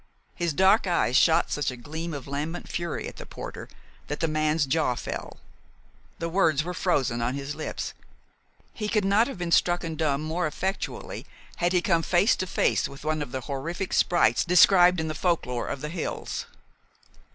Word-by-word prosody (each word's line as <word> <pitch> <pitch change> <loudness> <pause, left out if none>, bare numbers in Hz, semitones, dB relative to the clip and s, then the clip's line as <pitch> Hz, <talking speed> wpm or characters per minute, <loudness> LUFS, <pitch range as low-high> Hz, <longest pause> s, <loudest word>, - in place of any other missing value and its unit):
His 170 -2 -1
dark 190 +6 +4
eyes 170 -8 +1
shot 165 +4 +4
such 145 - 0
a 125 - -6
gleam 160 +7 -6
of 140 -3 -6
lambent 150 +5 -4
fury 170 -2 -3
at - - -9
the - - -8
porter - - -8 0.4
that 145 - -4
the 165 - +1
man's 155 0 +1
jaw 135 -2 +1
fell. - - -6 0.8
The 165 - -3
words 165 -4 +2
were 180 +2 -4
frozen 135 -10 0
on 120 +3 -1
his 140 +1 -4
lips. - - -5 0.8
He 210 -1 -3
could 210 -3 +1
not 205 +4 +4
have 275 - -6
been 175 -1 -3
stricken 175 -1 +2
dumb 150 -2 0
more 160 +2 -1
effectually 190 +6 -4 0.3
had 175 0 +1
he 180 -1 +2
come 170 -3 +2
face 180 +7 +3
to 185 - -2
face - - +1
with 140 +2 -12
one 155 0 0
of 145 - -5
the 130 -1 -3
horrific 165 +8 -4
sprites 175 -1 +3
described 180 0 +6
in 160 - -1
the 155 - -2
folklore 155 -8 -1
of 140 - -4
the 150 - -4
hills. 170 0 -4
165 Hz, 185 wpm, -26 LUFS, 145-180 Hz, 0.8 s, described